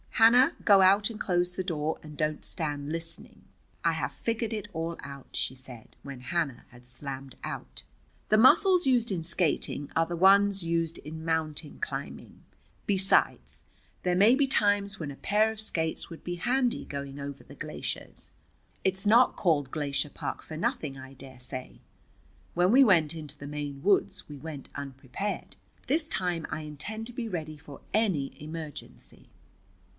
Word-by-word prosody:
"Hannah, 245 +7 +6
go 200 -2 +7
out 200 +3 +5
and 225 -2 -8
close 180 -3 +1
the 185 - -3
door, 160 -4 -2
and 150 -1 -10
don't 155 0 -1
stand 150 -4 -3
listening. 165 0 -6 0.4
I 165 - +3
have 140 -4 -2
figured 230 +5 -2
it 210 -2 -4
all 165 0 -3
out," 140 -1 -9
she 130 - -2
said, 125 -3 -12
when 135 -3 -8
Hannah 140 -2 -2
had 120 0 -17
slammed 135 +1 -6
out. - - -6 0.5
"The 215 - +5
muscles 350 - +6
used 245 -4 +3
in 175 -4 -1
skating 160 -4 -1
are 165 - +4
the 175 - -4
ones 195 +2 +5
used 165 -1 0
in 160 +2 -8
mountain 160 -2 -1
climbing. - - -6 0.4
Besides, 195 -1 +1 0.4
there 180 -1 +2
may 210 +7 +6
be 280 +1 +3
times 205 -5 +2
when 155 -4 -4
a - - -8
pair 215 +7 +2
of 220 - -8
skates 160 -7 -1
would 165 - -10
be 175 - -3
handy 245 +6 0
going 140 0 -6
over 140 -1 -6
the - - -13
glaciers. - - -5 0.5
It's 190 +2 +1
not 235 +4 +6
called 145 -8 +1
Glacier 145 -1 -1
Park - - -5
for 155 - -7
nothing, 150 -3 -2
I 130 +1 -10
dare 130 -1 -13
say. 130 0 -7 0.7
When 180 +2 +3
we 270 +3 +8
went 165 - +4
into 150 -3 -8
the 140 - -8
Maine 145 -1 -5
woods 195 +4 +2
we 145 - -7
went 145 -1 -8
unprepared. 140 +7 -5 0.3
This 310 +3 +2
time 180 - -1
I 155 - -3
intend 200 +10 -6
to 245 - -9
be 235 -1 -3
ready 155 -5 -4
for 145 -1 -12
any 190 -11 +1
emergency." 155 -1 -9
165 Hz, 165 wpm, -29 LUFS, 145-205 Hz, 0.7 s, we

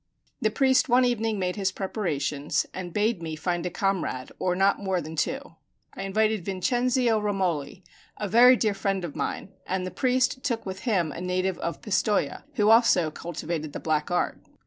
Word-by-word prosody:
The 215 - +3
priest 265 +5 +3
one 250 +1 +5
evening 225 -3 0
made 180 0 -2
his 195 -2 0
preparations, 155 -8 -2
and 180 -1 -6
bade 210 0 0
me 160 -1 -4
find 175 +2 -2
a - - -2
comrade, 180 -9 -2
or 180 -1 0
not 195 +2 +3
more 190 -2 0
than 160 -1 -7
two. 270 - -3 0.4
I - - -7
invited 215 +1 +1
Vincenzio 240 +4 +1
Romoli, 185 -4 -2 0.3
a 210 - -3
very 245 +5 +7
dear 215 -3 +1
friend 195 -2 -1
of 155 - -7
mine, - - -3 0.2
and 185 0 -1
the 185 - -5
priest 255 0 +1
took 235 -5 -2
with 190 -1 -5
him 175 -8 +1
a 170 - -7
native 185 0 -1
of 170 - -4
Pistoja, 205 0 0
who 210 -3 +4
also 205 -8 +5
cultivated 160 -1 -5
the - - -4
black 155 -1 -1
art. 175 - 0
195 Hz, 180 wpm, -26 LUFS, 175-225 Hz, 0.4 s, very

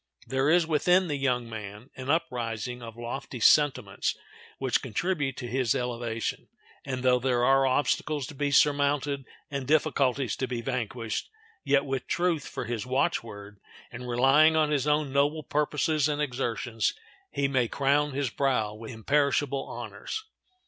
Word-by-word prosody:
There 135 +2 +1
is 170 +1 +4
within 180 +3 +3
the 145 - 0
young 125 -4 0
man 105 +2 -8
an 130 +1 -7
uprising 125 -6 -1
of 115 -1 -9
lofty 120 +1 -6
sentiments 125 -6 +3 0.4
which 130 -3 0
contribute 140 - -2
to 125 - -5
his 125 -1 +1
elevation, 120 -2 -3 0.4
and 130 -2 -4
though 125 -1 +4
there 125 -1 +1
are 135 0 +4
obstacles 145 +2 0
to 155 - -9
be 145 +1 -1
surmounted 145 -1 +2 0.3
and 140 -2 -3
difficulties 140 -5 +2
to 130 - -2
be 120 -1 -3
vanquished, 115 -2 -3 0.3
yet 140 -1 +2
with 135 -2 -3
truth 170 -4 0
for - - -5
his 115 -1 -3
watchword, 115 -7 -2 0.3
and 125 0 -7
relying 135 +6 +5
on 155 -1 +2
his 145 -1 +1
own 150 -2 +1
noble 145 +3 +2
purposes 150 +1 +1
and 145 0 -1
exertions, 120 -4 -1 0.3
he 140 - 0
may 130 -3 +1
crown 140 +3 +1
his 135 -3 -1
brow 125 -7 0
with 110 +1 -9
imperishable 140 +3 +1
honors. 435 - -6
135 Hz, 150 wpm, -28 LUFS, 120-145 Hz, 0.4 s, relying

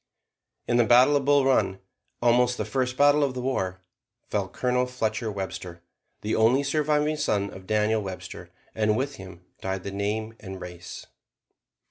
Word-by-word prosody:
In 120 - +2
the 120 - +5
battle 125 +5 +6
of 140 -2 +1
Bull 145 -1 +4
Run, 110 -8 +2 0.4
almost 125 +1 +3
the - - -2
first 130 -1 -1
battle 145 +1 +5
of 135 -2 -1
the 125 - -3
war, 95 -8 -2 0.5
fell - - -1
Colonel 125 0 0
Fletcher 110 -2 -2
Webster, 90 -3 -6 0.4
the 105 - -1
only 120 +5 +4
surviving 150 +1 +1
son 100 -8 0
of 95 0 -12
Daniel 110 +1 +2
Webster, 95 -2 -8 0.2
and 105 0 +1
with 135 +1 -2
him 90 -1 -12 0.2
died 95 -1 -3
the 100 - -5
name 105 +3 -2
and 95 -2 -8
race. 90 -1 -9
110 Hz, 160 wpm, -26 LUFS, 100-130 Hz, 0.5 s, battle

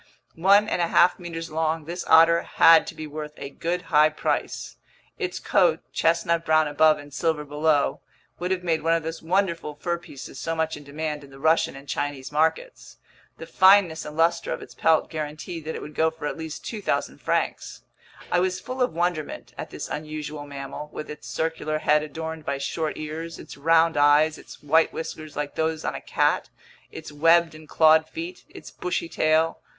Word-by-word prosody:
One 200 +5 +4
and 180 - -1
a 170 - +2
half 180 +1 +4
meters 165 -2 -6
long, 160 0 -1
this 175 +3 -5
otter 165 +1 +6
had 165 -1 +5
to - - -7
be 155 - -6
worth 150 0 -7
a 140 - -7
good 175 +4 -3
high 150 +1 +6
price. 155 - -3 0.4
Its - - -3
coat, - - +2
chestnut 170 0 +1
brown 155 -1 +3
above 155 +1 +4
and 145 -1 -12
silver 155 -1 -1
below, 145 0 +1 0.4
would 180 +1 -2
have 185 -1 -1
made 165 -3 0
one 165 +2 +2
of 165 - -2
those 160 +1 -5
wonderful 170 -3 -1
fur 170 +3 -2
pieces 135 -5 -10
so 165 - -2
much 160 0 -1
in 145 - -11
demand 150 +1 -4
in 140 - -14
the 135 - -14
Russian 160 +2 +2
and 140 +1 -12
Chinese 145 -2 -3
markets; 160 - -1 0.4
the - - -8
fineness 190 -4 +4
and 150 +1 -9
luster 165 +1 +2
of - - -4
its - - -13
pelt 160 -1 +2
guaranteed 155 +1 -6
that 160 - -4
it - - -6
would 150 - -9
go 160 +1 +2
for 160 -2 -9
at - - -2
least 160 -1 -7
2,000 215 -3 -2
francs. - - -2 0.5
I 175 - +3
was 185 0 0
full 255 +1 -6
of 250 -10 +1
wonderment 170 -3 -2
at - - -7
this - - -6
unusual 150 -1 -6
mammal, 140 +1 -7
with 150 - -7
its 150 - -10
circular 160 -1 -2
head 150 0 +3
adorned 160 +1 -6
by 140 -1 -2
short 155 +3 -3
ears, 160 +2 -6
its - - -10
round 165 +3 +3
eyes, 145 +2 +4
its - - -14
white 160 +3 +3
whiskers 155 -2 -7
like 145 -1 -3
those 160 0 -2
on - - -1
a - - -6
cat, - - 0 0.4
its - - -9
webbed 165 +2 +4
and 155 0 -14
clawed 160 0 +5
feet, 170 +3 -7
its - - -12
bushy 180 -1 -3
tail. 160 0 +1
160 Hz, 195 wpm, -25 LUFS, 150-165 Hz, 0.5 s, otter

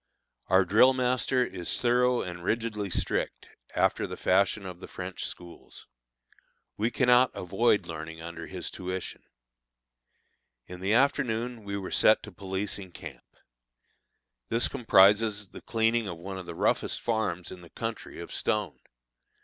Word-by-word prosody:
Our 95 +1 +4
drill 125 +7 +6
master 125 0 +1
is 90 -6 -3
thorough 125 0 +3
and 85 -1 -7
rigidly 110 -1 -1
strict, - - -2 0.3
after - - +2
the - - -7
fashion 100 +2 +2
of 90 -2 -7
the - - -9
French 90 0 -5
schools. 85 -1 -10 0.9
We 110 +3 0
cannot 125 0 +4
avoid 105 +4 +1
learning 80 0 -7
under 85 0 -7
his 95 -2 -5
tuition. 95 0 -5 1.4
In 90 0 -9
the 100 +4 +1
afternoon 125 -3 +1
we 100 0 -4
were 95 -2 -6
set 110 - +5
to 105 - -9
policing 95 0 -5
camp. - - -11 1.1
This 115 +1 +3
comprises 105 -1 +4
the - - -11
cleaning 115 -1 +1
of 85 -3 -5
one 95 +3 -6
of 90 - -9
the 85 - -6
roughest - - +1
farms 110 -7 -2
in 90 - -9
the 85 - -14
country 115 +4 -6
of - - -8
stone. 105 -8 -1
100 Hz, 140 wpm, -28 LUFS, 90-115 Hz, 1.4 s, drill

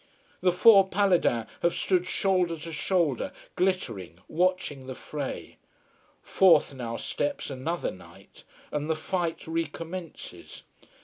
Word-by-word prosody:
The 180 - +4
four 195 +1 +7
Paladins 180 - +2 0.2
have 170 0 +2
stood 180 -1 +1
shoulder 185 -4 +1
to 160 +1 -8
shoulder, 160 -4 0 0.2
glittering, 115 - -1
watching 165 -6 0
the 130 - -5
fray. 145 0 -6 0.7
Forth 165 -7 +4
now 120 -3 -5
steps 145 0 -3
another 155 +7 -2
knight, 90 - -16 0.3
and 150 +1 -2
the 160 - +2
fight 170 +1 -3
recommences. 165 +1 -6
165 Hz, 115 wpm, -27 LUFS, 145-185 Hz, 0.7 s, four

